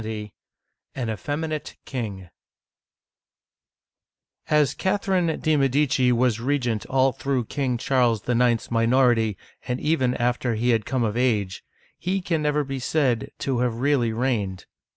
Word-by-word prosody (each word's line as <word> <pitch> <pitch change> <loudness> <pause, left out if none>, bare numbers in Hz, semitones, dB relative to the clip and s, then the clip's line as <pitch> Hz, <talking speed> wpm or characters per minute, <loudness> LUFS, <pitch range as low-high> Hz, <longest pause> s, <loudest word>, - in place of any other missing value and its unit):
LXX. 105 -1 -5 0.6
AN 125 -4 -3
EFFEMINATE 150 - -4
KING 100 -8 -5 2.2
AS 150 -3 +3
Catherine 190 -4 0
de* 155 0 +2
Medici 135 -2 +2
was 120 -2 +2
regent 125 -4 -1
all 135 0 +3
through 135 -2 -2
King 130 -1 -1
Charles 120 -3 +1
IX.'s 120 -1 +1
minority 115 -2 +3 0.3
and 125 0 -1
even 130 -5 +1
after 120 0 0
he 120 +3 0
had 115 -2 0
come 130 -2 0
of 110 -1 -1
age, 110 -7 0 0.4
he 185 +3 -1
can 170 -4 -1
never 150 0 +1
be 135 -1 -4
said 130 -4 0
to 130 -3 -1
have 125 -2 0
really 125 -2 +1
reigned. 110 -6 -1
125 Hz, 130 wpm, -24 LUFS, 115-140 Hz, 2.2 s, AS